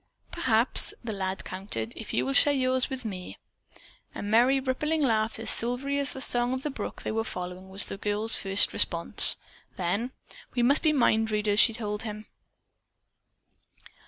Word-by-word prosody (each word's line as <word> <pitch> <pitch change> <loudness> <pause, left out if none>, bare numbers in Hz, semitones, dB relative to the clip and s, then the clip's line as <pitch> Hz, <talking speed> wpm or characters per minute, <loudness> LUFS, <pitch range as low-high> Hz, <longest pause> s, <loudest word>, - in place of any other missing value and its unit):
"Perhaps," 240 -8 +3
the 225 -2 -5
lad 190 -1 -5
countered, 150 - -6
"if - - -8
you 125 - -1
will 135 - -2
share 290 - +4
yours 255 0 0
with 260 -3 -7
me." 185 -4 -7 0.8
A - - -6
merry, 240 +6 +2
rippling 300 +4 -2
laugh, 220 -3 0
as 225 - +1
silvery 260 +4 0
as 280 -1 0
the 265 - -7
song 245 0 +2
of 260 +1 -5
the 300 - -3
brook 220 - -8
they - - -4
were 225 +1 -2
following, 180 -2 -8
was 195 +2 +1
the - - -8
girl's 210 +2 0
first 195 +1 0
response. - - +5 0.4
Then, 200 +8 -2 0.4
"We 240 - 0
must 275 +5 +3
be 315 - +2
mind 225 -6 +1
readers," 210 -1 0
she 225 - +4
told 210 -2 -5
him. 215 -1 -7
225 Hz, 170 wpm, -26 LUFS, 205-260 Hz, 0.8 s, response